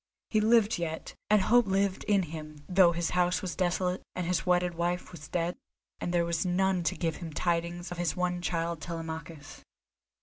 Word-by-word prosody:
He 215 - +3
lived 220 -2 +4
yet, 160 -2 -4 0.2
and 210 -2 +5
hope 240 +2 +4
lived 195 0 0
in 200 -2 +3
him 155 -2 -8
though 180 -2 +6
his 170 -1 -1
house 180 +2 +1
was 180 - -3
desolate, 180 0 0
and 180 - -2
his 180 +1 -1
wedded 180 -1 +3
wife 175 +2 -2
was 150 -5 -10
dead, 175 0 -1 0.4
and 175 - -2
there 175 -1 +2
was 170 -1 0
none 185 0 +1
to - - +1
give 165 -2 -1
him 165 -3 -7
tidings 175 +2 -1
of 175 - -5
his 175 -3 0
one 180 -1 -1
child, 170 -1 -2
Telemachus. 160 -2 -7
175 Hz, 190 wpm, -29 LUFS, 165-185 Hz, 0.4 s, though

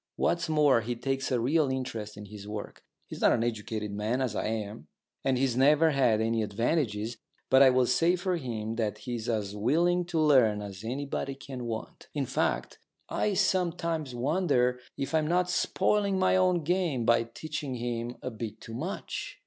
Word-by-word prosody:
What's 170 -1 0
more, 150 -6 +4
he 120 +2 -3
takes 135 +3 -2
a 125 - +2
real 145 +4 +2
interest 115 -5 -4
in 105 - -8
his 105 0 -10
work. 105 0 -7 0.2
He's - - -9
not - - +5
an 115 - +1
educated 110 -2 -3
man, 105 +5 -1
as 125 -5 -1
I - - -1
am, 105 -8 -4 0.4
and 135 -1 +2
he's 130 -2 +1
never 150 +5 +5
had 125 -6 +3
my 115 0 +1
advantages, 110 +1 -1 0.3
but 130 +1 +7
I 135 - +9
will 130 0 +3
say 165 +9 +3
for 180 0 -1
him 115 -7 -4
that 105 -2 -1
he's 120 0 -5
as 105 -3 -1
willing 170 +11 +2
to 170 -2 -1
learn 130 -9 +4
as 100 -1 -7
anybody 135 +3 -3
can 130 -2 -7
want. 115 -1 -6
In 140 -2 0
fact, - - -1 0.3
I 210 -2 0
sometimes 165 -7 0
wonder 125 -2 +1 0.2
if 135 - -3
I'm 155 -1 +2
not 180 +2 +1
spoiling 200 +2 +1
my 185 0 +3
own 185 -2 +3
game 165 -7 0
by 120 0 +4
teaching 140 +2 -5
him 120 0 -3
a 130 - -3
bit 110 -1 -6
too 115 - -10
much. 160 - -5
125 Hz, 180 wpm, -29 LUFS, 110-155 Hz, 0.4 s, I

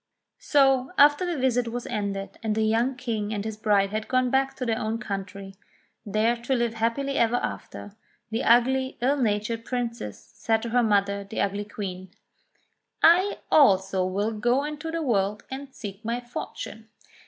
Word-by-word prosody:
So, 270 -3 +3
after 290 +5 +5
the 345 -3 -2
visit 250 -2 +1
was 240 +1 -4
ended, 200 -3 -4
and 220 -2 -1
the 220 - +1
young 230 +4 +1
King 225 -5 -3
and 210 -1 -3
his 220 -1 -4
bride 205 -2 +2
had 215 +1 -3
gone 255 -1 +1
back 270 0 +1
to 255 - -4
their 225 -2 0
own 220 +1 -2
country, 195 -2 -6 0.5
there 215 +3 +2
to 240 +3 -1
live 235 -2 0
hap 230 +2 0
pily 275 0 -2
ever 235 0 +3
after, 205 -3 -5 0.4
the 225 +3 -1
ugly 260 +3 +3
ill 270 +4 +2
natured 225 -1 -1
princess 235 - -4 0.2
said 225 -1 0
to 235 - -3
her 245 +2 +3
mother, 200 -2 +1
the 200 +3 -6
ugly 200 +1 -1
Queen: 190 -3 -6 0.9
*'I 365 +5 +5
also 190 -8 +4
will 200 +4 -1
go 240 +5 +1
into 300 +1 -5
the 330 0 -2
world 210 -5 0
and 270 +1 -6
seek 205 -3 -8
my 235 +2 -2
fortune. 225 -2 -7
230 Hz, 175 wpm, -26 LUFS, 205-255 Hz, 0.9 s, after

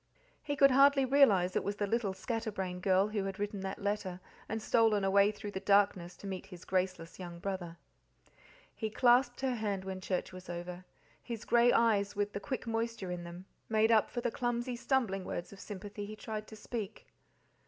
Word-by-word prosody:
He 290 - -2
could 275 -1 +6
hardly 275 +1 +6
realize 215 -10 +4
it - - +1
was 200 +1 -2
the 205 - -1
little 215 -1 0
scatterbrain 195 -4 -3
girl 190 +2 +3
who 210 -2 -1
had 195 -1 -4
written 205 0 -3
that 190 +1 -5
letter, 200 -3 -2 0.3
and 220 - -2
stolen 220 -2 +3
away 200 +1 +5
through 205 0 -7
the 190 - -4
darkness 195 -3 +2
to - - -12
meet 190 -1 -5
his 180 -3 -11
graceless 185 -3 -2
young 175 -2 -7
brother. 175 -2 -4 1.0
He 220 - -3
clasped 245 +2 +3
her 265 -1 +1
hand 205 -5 -2
when 190 -1 -5
church 185 0 -2
was 185 0 -10
over; 175 +1 -6 0.4
his 230 -3 -6
grey 240 0 +5
eyes, 210 -5 +3
with 205 0 -1
the - - -3
quick 260 +5 -4
moisture 225 -4 -2
in 175 -1 -4
them, 175 +2 -9 0.2
made 220 0 +3
up 220 -2 +4
for 240 - -3
the 240 -1 -1
clumsy 240 +1 -2
stumbling 235 -6 0
words 175 +1 -5
of 200 - -13
sympathy 205 0 -7
he 215 - -7
tried 215 0 -6
to 220 - -10
speak. 215 -1 -6
205 Hz, 195 wpm, -32 LUFS, 190-230 Hz, 1.0 s, could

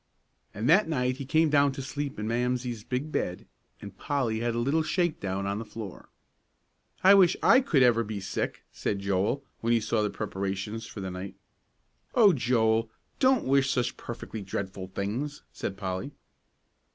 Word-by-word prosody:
And 110 +4 -3
that 180 +4 +5
night 125 -4 0
he 135 -2 -6
came 160 +1 +3
down 140 -1 +4
to 135 - -5
sleep 145 +1 -4
in 105 +1 -3
Mamsie's 120 -1 -1
big 130 +6 -3
bed, 90 -9 -2 0.3
and 100 -2 -10
Polly 125 -4 -1
had 120 0 -1
a - - 0
little 140 +7 +2
shake 175 +1 0
down 95 0 -2
on 100 +1 -2
the - - -4
floor. 110 -4 -9 0.9
"I 190 +2 +9
wish 190 -4 +6
I 255 +3 +7
could 145 - +3
ever 115 -2 +4
be 105 -1 -5
sick!" 95 0 -3
said 100 - -2
Joel, 100 +7 0 0.2
when 115 +1 +1
he 115 - +4
saw 110 0 0
the 105 - +1
preparations 100 +2 -4
for 105 - -8
the 95 -1 -4
night. 90 +2 -7 0.8
"Oh, 210 -6 +7
Joel, 115 -4 +2 0.3
don't 260 -2 +4
wish 135 0 +3
such 125 -2 0
perfectly 115 -2 -7
dreadful 95 -1 -5
things," 115 +11 -4
said 95 - -4
Polly. 95 +8 -4
115 Hz, 175 wpm, -28 LUFS, 100-140 Hz, 0.9 s, I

